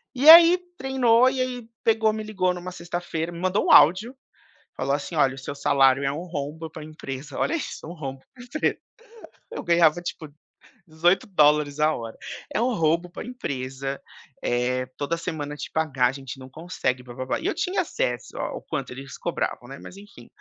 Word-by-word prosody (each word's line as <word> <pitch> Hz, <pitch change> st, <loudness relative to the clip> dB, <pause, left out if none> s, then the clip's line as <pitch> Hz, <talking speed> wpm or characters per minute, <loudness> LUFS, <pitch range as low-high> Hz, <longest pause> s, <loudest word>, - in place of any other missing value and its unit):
E 280 Hz, +5 st, +5 dB
aí 335 Hz, +2 st, +10 dB, 0.2 s
treinou 255 Hz, -2 st, +3 dB
e 260 Hz, -1 st, -2 dB
aí 250 Hz, -3 st, -4 dB, 0.2 s
pegou, 220 Hz, -1 st, +3 dB
me 215 Hz, -, -4 dB
ligou 190 Hz, -4 st, 0 dB
em -, -, -7 dB
uma 180 Hz, +1 st, -7 dB
sexta-feira, 175 Hz, -1 st, -4 dB
me 170 Hz, -, -8 dB
mandou 185 Hz, +3 st, 0 dB
um -, -, +2 dB
áudio, 195 Hz, -, +6 dB, 0.6 s
falou 140 Hz, +1 st, 0 dB
assim: 145 Hz, +4 st, -4 dB
"Olha, 135 Hz, -2 st, +3 dB
o -, -, -10 dB
seu 135 Hz, +2 st, -6 dB
salário 140 Hz, -1 st, +3 dB
é 135 Hz, -, +1 dB
um 165 Hz, +5 st, -5 dB
rombo 160 Hz, 0 st, -5 dB
para 155 Hz, 0 st, -9 dB
empresa", 150 Hz, -2 st, -8 dB
olha -, -, 0 dB
isso 295 Hz, -, -6 dB
um 170 Hz, -, -7 dB
rombo 135 Hz, -5 st, -6 dB
para 245 Hz, -2 st, -12 dB
empresa. 250 Hz, +6 st, -1 dB, 0.7 s
Eu -, -, -5 dB
ganhava 170 Hz, -1 st, +4 dB
tipo, 160 Hz, -3 st, -6 dB, 0.6 s
$18 175 Hz, +4 st, +2 dB
dólares 150 Hz, -5 st, +3 dB
a 155 Hz, +1 st, +3 dB
hora. 115 Hz, -1 st, -7 dB, 0.4 s
"É -, -, 0 dB
um 250 Hz, 0 st, +1 dB
roubo 165 Hz, 0 st, +1 dB
para 175 Hz, -, -8 dB
empresa, 135 Hz, -, -5 dB, 0.4 s
eh, 125 Hz, +1 st, 0 dB
toda 145 Hz, +4 st, -1 dB
semana 155 Hz, -4 st, -5 dB
te -, -, -7 dB
pagar 140 Hz, -6 st, +1 dB
a 125 Hz, -, -1 dB
gente 135 Hz, -1 st, -8 dB
não 130 Hz, 0 st, -11 dB
consegue 155 Hz, -5 st, -3 dB
blá-blá-blá". 130 Hz, +1 st, -4 dB
E -, -, -9 dB
eu 400 Hz, -, 0 dB
tinha 380 Hz, 0 st, 0 dB
acesso 125 Hz, -, -3 dB
ao -, -, -4 dB
quanto -, -, -5 dB
eles 135 Hz, +1 st, -9 dB
cobravam, 120 Hz, -, -3 dB
né, 140 Hz, -, -9 dB
mas -, -, -11 dB
enfim. 200 Hz, -13 st, -14 dB
160 Hz, 190 wpm, -24 LUFS, 135-200 Hz, 0.7 s, aí